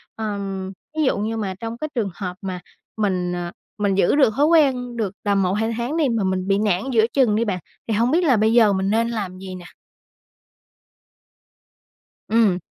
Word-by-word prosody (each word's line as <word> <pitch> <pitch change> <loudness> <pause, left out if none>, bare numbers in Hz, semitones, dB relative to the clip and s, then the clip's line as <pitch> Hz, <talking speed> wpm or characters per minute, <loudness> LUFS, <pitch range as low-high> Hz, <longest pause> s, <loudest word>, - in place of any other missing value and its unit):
Ờm, 200 -3 -4 0.3
ví 310 - +2
dụ 260 - +2
như 220 +2 -2
mà 195 -3 -2
trong 230 0 -5
cái 310 +5 -4
trường 220 -5 0
hợp 180 -3 -5
mà 185 -2 -4 0.4
mình, 185 -4 0
ờ, 175 -1 -4 0.3
mình 200 -2 +1
giữ 195 +4 +3
được 270 -7 +4
thói 285 +3 +3
quen 265 -7 +2
được 210 -5 -2
tầm 200 -1 +2
1-2 210 +5 0
tháng 245 +7 -2
đi 305 -5 +2
mà 230 -3 0
mình 185 0 -1
bị 195 0 +3
nản 200 -4 +1
giữa 225 -3 +4
chừng 250 -7 +3
đi 230 +2 +1
bạn, 195 -4 -2 0.3
thì 225 - 0
hông 235 +5 +2
biết 345 +3 +3
là 265 -9 +4
bây 220 +2 +3
giờ 225 -4 +5
mình 190 0 0
nên 230 +2 +1
làm 200 -6 -4
gì 185 0 -8
nè? 180 -1 -10 2.6
Ừm. 215 -5 +3
215 Hz, 200 wpm, -22 LUFS, 190-235 Hz, 2.6 s, giờ